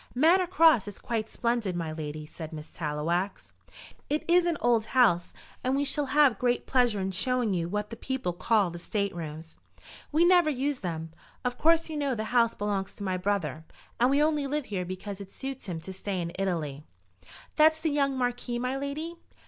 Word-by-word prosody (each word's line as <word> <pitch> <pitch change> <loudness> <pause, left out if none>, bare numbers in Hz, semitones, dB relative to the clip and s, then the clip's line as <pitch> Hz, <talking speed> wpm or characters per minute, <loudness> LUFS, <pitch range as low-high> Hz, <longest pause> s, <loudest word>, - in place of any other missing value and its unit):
"Manor 345 +7 +5
Cross 320 - +5
is 205 - -7
quite 225 -2 -3
splendid, 235 -6 -1
my 165 -2 -3
lady," 155 -1 -5
said 155 +1 -8
Miss 155 -1 -8
Tallowax. 170 +5 -2 0.6
"It 300 +1 -1
is 350 0 +4
an 335 -3 +1
old 235 -2 +2
house, 175 -9 +4 0.3
and 255 +1 +1
we 280 - +1
shall 290 0 0
have 285 -3 +4
great 245 -1 +1
pleasure 245 -5 +2
in 190 0 -1
showing 240 +2 0
you 170 -2 -1
what 210 +3 -3
the - - -5
people 255 -6 -3
call 200 0 +2
the 175 - -7
state 200 +2 -2
rooms. 160 -1 -7 0.5
We 320 +3 +4
never 350 -3 +5
use 280 -1 -1
them. 165 -3 -4 0.3
Of 250 0 -2
course 330 +1 +4
you 315 -2 -5
know 280 -3 0
the 215 - -2
house 230 -2 +4
belongs 200 -2 -2
to 205 - -8
my 185 -2 -1
brother, 180 -4 -1 0.4
and 245 +2 +4
we 285 +2 +4
only 300 -2 +1
live 295 0 -2
here 185 -3 -3
because 185 +2 -6
it 195 - -10
suits 265 -3 -6
him 170 -3 -3
to 190 - -7
stay 190 0 -3
in 170 -1 -3
Italy." 155 -7 -2 0.7
"That's 315 +1 +5
the 315 -1 0
young 275 -2 +1
Marquis, 245 -1 -1
my 250 +2 -1
lady?" 305 +5 -4
230 Hz, 195 wpm, -28 LUFS, 180-280 Hz, 0.7 s, Manor